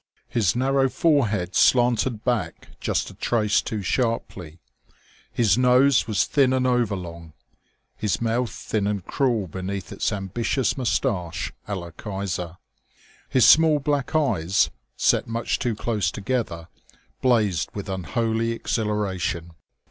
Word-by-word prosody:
His 110 -6 +1
narrow 135 +1 +2
forehead 110 - +1
slanted 120 -2 +3
back 110 -10 -2
just - - -1
a - - -13
trace 105 -3 +1
too 105 -3 -4
sharply, 95 - -2 0.7
his 115 0 +2
nose 125 0 +4
was 110 -3 +1
thin 135 -3 +2
and 130 -1 +1
overlong, 95 -10 -2 0.6
his 105 -6 -1
mouth 120 +1 0
thin 105 -2 -2
and 100 -3 -2
cruel 120 -7 0
beneath 95 +2 -5
its - - -1
ambitious 105 +6 -1
mustache 90 -8 -1
à 100 -1 -2
la 85 -2 -8
Kaiser; 90 -2 -5 0.7
his 130 -4 +5
small 160 -1 +6
black 145 -1 -1
eyes, 95 - +2 0.3
set - - +2
much 115 +1 -2
too 120 -5 -1
close 105 -3 -1
together, 105 -7 -3 0.5
blazed 110 - +2
with 100 - -5
unholy 110 +6 -1
exhilaration. 100 -7 -2
110 Hz, 125 wpm, -24 LUFS, 95-125 Hz, 0.7 s, small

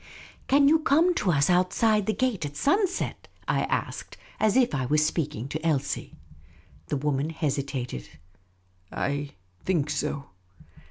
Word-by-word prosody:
" - - -25
Can 280 +1 +5
you 315 +2 +5
come 320 +4 +3
to 200 - +1
us 140 -2 +3
outside 190 +4 +2
the 215 - +2
gate 245 -9 0
at 145 -1 -4
siinset? 370 - 0
" - - -32
I - - +1
asked, - - -3 0.2
as 215 +2 +3
if 250 -2 +4 0.3
speaking 150 -5 -1
to 155 +2 -4
Elsie. 155 -5 -1 0.7
The - - -1
woman 145 +1 -1
hesitated. 140 - -3 0.5
'' 90 0 -38
I 145 0 -2 0.3
think 155 -6 0
so." 140 -1 -3
155 Hz, 145 wpm, -26 LUFS, 140-220 Hz, 0.7 s, Can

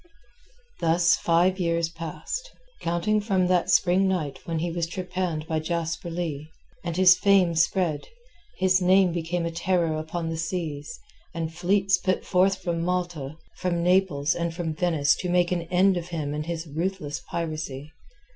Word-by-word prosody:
Thus 165 0 +3
five 175 +3 +2
years 170 -1 +1
passed, 165 - -6 0.3
counting 210 +6 0
from 195 -3 +1
that 180 -1 +2
spring 185 +2 +4
night 155 -7 -2
when 165 -1 -2
he 170 +2 -1
was 170 0 -2
trepanned 180 -3 -3
by 160 -1 -1
Jasper 165 +1 -3
Leigh, 160 -3 -4 0.3
and 170 -1 -3
his 185 0 +7
fame 195 -4 +4
spread, 165 -2 +1 0.5
his 185 0 +3
name 185 0 +4
became 170 +1 -2
a 170 - -2
terror 170 -1 0
upon 165 +1 -4
the 165 - -3
seas, 160 +1 -4 0.4
and 165 -1 -3
fleets 190 +2 +2
put 185 0 -1
forth 190 +1 +2
from 170 -2 -1
Malta, 170 -5 -2 0.2
from 175 -2 -1
Naples, 175 -5 +2
and 170 -1 -3
from 165 -3 -3
Venice 155 -5 +2
to 180 - -3
make 175 0 +2
an 170 -2 -1
end 185 +1 +4
of 170 0 -4
him 155 -4 -3
and 150 +1 -4
his 170 -1 -3
ruthless 160 -1 -3
piracy. 155 -3 -4
170 Hz, 160 wpm, -25 LUFS, 160-185 Hz, 0.5 s, his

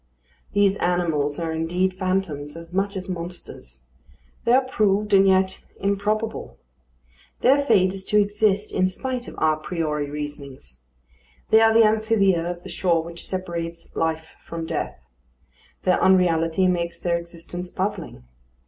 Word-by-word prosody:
These 200 -1 +3
animals 165 -5 0
are 165 -1 -2
indeed 175 +4 0
phantoms 185 -6 -2
as 165 +1 -11
much 195 +1 0
as 185 - -6
monsters. 170 - -7 0.6
They 235 - +4
are 265 +1 +5
proved 210 -4 +1
and 195 0 +6
yet 190 0 +2 0.2
improbable. 210 +3 -1 0.8
Their 275 +3 +5
fate 195 -8 +3
is 195 -1 -5
to 210 - +3
exist 205 0 +1
in 185 0 +2
spite 250 +6 -4
of - - -9
à 155 -1 +1
priori 150 -4 -2
reasonings. 140 - -7 0.7
They 220 - +7
are 225 0 +6
the 225 0 +6
amphibia 215 -5 +2
of 175 0 -6
the - - -9
shore 170 -3 +1
which 170 +1 -8
separates 170 -3 -5
life 160 0 -1
from 165 -1 -5
death. - - -3 0.9
Their 180 - +2
unreality 180 -1 +3
makes 170 -2 0
their 170 -1 0
existence 170 +1 -8
puzzling. 185 - -4
180 Hz, 140 wpm, -23 LUFS, 165-200 Hz, 0.9 s, They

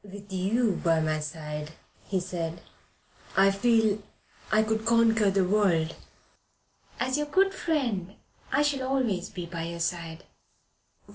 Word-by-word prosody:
"With 200 0 -11
you 200 +3 +1
by 165 -1 +3
my 155 -1 0
side," 150 0 -6 0.5
said 175 -3 -3
he, 170 - -13 0.8
"I 195 +1 +6
feel 220 0 +2 0.5
I 215 0 +4
could 220 0 -1
conquer 225 -2 +4
the 195 -1 +2
earth." 170 -6 +2 1.1
"As 260 +2 0
your 295 - -1
good 390 +5 +3
friend 235 - -1 0.4
I 290 +3 +3
shall 275 -3 0
always 240 -9 0
be 175 - -6
by 170 -1 -5
your 170 0 -5
side. 170 -1 -3
195 Hz, 135 wpm, -28 LUFS, 170-230 Hz, 1.1 s, I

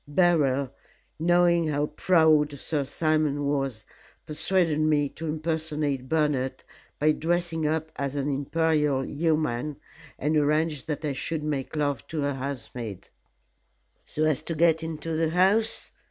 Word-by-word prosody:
Beryl, 145 -5 +2 0.5
knowing 170 0 +3
how 145 -1 0
proud 155 -3 +3
Sir 145 +1 -2
Simon 155 0 0
was, 135 -6 -1 0.4
persuaded 155 0 +1
me 150 -2 +2
to 160 +3 -7
impersonate 155 -4 -2
Bernard 150 -4 0 0.3
by 155 +1 +3
dressing 165 0 0
up 160 +1 -1
as 140 0 -2
an 140 0 -1
Imperial 145 -1 +1
Yeoman, 150 -3 -1 0.4
and 150 +3 0
arranged 150 0 +1
that 155 0 -3
I 145 - -1
should 155 +3 -3
make 145 -1 -3
love 145 -4 -1
to 155 -3 -2
a 145 - 0
housemaid 125 -6 -6 0.5
" - - -43
"So 155 - -3
as 155 -4 +2
to 165 - -4
get 165 0 +3
into 160 0 -4
the 160 0 +1
house?" 195 +6 +2
150 Hz, 140 wpm, -26 LUFS, 140-160 Hz, 0.5 s, knowing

